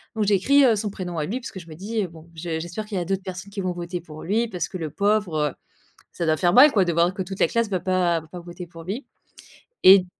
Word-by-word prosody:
Donc 215 - +1
j'écris 210 +8 +4
heu, 230 -5 +5
son 210 0 -2
prénom 180 -3 -6
à 150 - 0
lui 235 +10 -3
puisque 200 -5 -7
je 170 - -13
me 155 - -10
dis, 210 +5 -2
heu: - - -3
«Bon, 165 0 -15
je 160 0 -3
j'espère 175 +6 -5
qu'il 210 -2 -4
y 180 - 0
a - - -3
d'autres 195 +1 -2
personnes 185 +1 -7
qui 200 - -6
vont 185 -1 -1
voter 175 0 -4
pour 155 -2 -11
lui 220 +6 +1
parce 180 -6 -3
que 185 - -5
le 160 -3 -4
pauvre, 200 -3 +1
heu, - - -10 0.6
ça 170 - -3
doit 155 0 +3
faire 175 -1 +2
mal 285 +3 +9
quoi, 195 -4 +3
de 170 - 0
voir 170 +2 +3
que 190 - -2
toute 195 +1 -7
la - - +4
classe 230 -1 0
va 185 -3 0
pas 180 -2 +1
va 160 - -16
pas 180 +2 -8
voter 175 0 -9
pour 165 -1 -11
lui» 210 - -5 0.8
et 190 +1 +10
d 180 - -6
185 Hz, 295 wpm, -24 LUFS, 170-205 Hz, 0.8 s, et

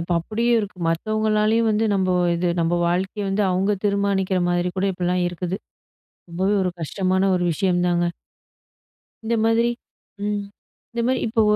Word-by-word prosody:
இப்ப 170 +1 -3
அப்டியே 230 +7 0
இருக்கு 200 -3 -7
மத்தவங்களாலயும் 215 +5 +1
வந்து 215 +1 +1
நம்ம 185 -2 +1 0.2
இது 175 +1 0
நம்ம 170 +1 +1
வாழ்க்கைய 190 +3 -1
வந்து 195 +2 +1
அவங்க 195 +3 +1
தீர்மானிக்கிற 200 -2 +1
மாரி 175 0 +1
கூட 195 - +1
இப்படிலாம் 180 0 0
இருக்குது. 175 +1 -4 0.7
ரொம்பவே 190 +4 0
ஒரு 180 - 0
கஷ்டமான 190 +4 +1
ஒரு 180 - 0
விஷயம்தாங்க. 175 -1 +1 1.2
இந்த 235 - 0
மாதிரி 225 +1 +3 0.6
ம் 205 -1 -1 0.5
இந்த 235 0 -1
மாரி 255 0 +2
இப்போ 225 0 +2
190 Hz, 140 wpm, -22 LUFS, 180-215 Hz, 1.2 s, மாதிரி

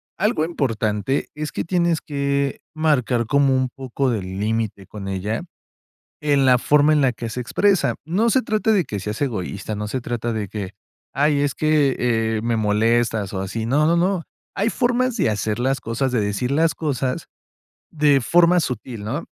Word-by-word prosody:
algo 210 -6 +1
importante 115 - -1
es 150 0 -5
que - - -3
tienes 170 -2 +1
que 140 -2 -1
marcar 130 -7 +1
como 140 +2 +3
un 130 0 0
poco 135 0 -1
de 110 -4 -1
límite 100 +2 -3
con 100 +1 -8
ella 95 +4 -2 0.8
en 140 -2 +3
la 125 -1 +6
forma 150 +4 +4
en 150 - +3
la 130 -2 +3
que 115 0 -6
se 120 +3 -4
expresa. 195 - +2
No 205 +8 +2
se 260 - +4
trata 220 -1 +1
de 195 -5 +3
que 105 - -5
seas 105 +2 -5
egoísta, 110 -5 -3
no 105 0 -4
se 130 +5 -2
trata 120 -1 -3
de 105 -3 -3
que: 100 -3 -5 0.4
"Ay, 145 +1 +3
es 140 -2 0
que, 150 -3 +2
eh, 115 -2 0
me 115 0 0
molestas", 110 -1 +1
o 95 - -2
así. 105 +4 -3
No, 145 +6 +3
no, 170 +2 +3
no, 180 +1 +1 0.3
hay 205 +3 +1
formas 250 0 +1
de 185 - +2
hacer 105 +1 -2
las 135 +1 0
cosas, 120 +3 -1
de 120 - +2
decir 105 +5 -1
las 160 +3 +2
cosas 135 -4 -2 0.7
de 145 -3 +3
forma 175 +6 +4
sutil, 120 -6 -4
¿no? 135 +10 -3
130 Hz, 185 wpm, -22 LUFS, 110-155 Hz, 0.8 s, la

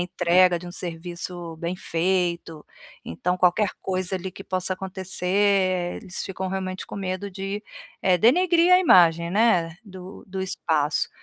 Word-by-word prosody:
entrega 175 0 +3
de 180 - -11
um 175 - -7
serviço 175 -1 -6
bem 170 +2 -3
feito, 170 -2 -1 0.4
então 180 -6 -2
qualquer 185 +3 +3
coisa 185 0 -2
ali 185 +1 -6
que 195 - -11
possa 185 0 -1
acontecer 185 0 0
eles 190 -3 -6
ficam 190 0 -5
realmente 185 -1 -4
com - - -9
medo 190 +1 -4
de, 195 +2 -5 0.4
eh, 185 -1 +4
denegrir 345 - +4
a 365 - +8
imagem, 170 - +5
né, 180 -6 +2
do 185 0 -11
do 190 0 -5
espaço. 155 -5 0
185 Hz, 145 wpm, -24 LUFS, 175-195 Hz, 0.4 s, a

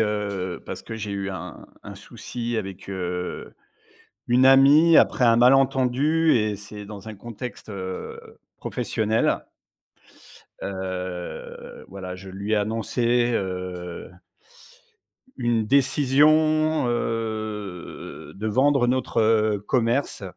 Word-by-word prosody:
heu, 100 -4 -2
parce - - -6
que 115 - -7
j'ai 105 -2 -5
eu 100 0 -3
un 95 - -8 0.2
un - - -8
souci 120 -1 -6
avec, 95 -3 -6
heu, 90 -1 -4 0.7
une 125 +2 +4
amie 140 +5 +7
après - - +4
un 115 -1 +5
malentendu 135 +5 +3
et 105 -3 +1
c'est 105 +1 -9
dans 100 0 -10
un 110 - -7
contexte, 120 +2 -8
heu, 95 -2 -6 0.4
professionnel. 110 0 -1 1.2
Heu, 95 -2 -6
voilà, 95 -1 -7
je 95 +1 -11
lui 100 +3 -5
ai - - +4
annoncé 120 +3 +1
heu 90 -3 -4 1.3
une 120 -3 0
décision, 150 +4 +3
heu, 110 -5 -4
de 105 +3 -5
vendre 130 +4 +3
notre 110 -4 +2
commerce 120 0 0
110 Hz, 105 wpm, -24 LUFS, 100-125 Hz, 1.3 s, amie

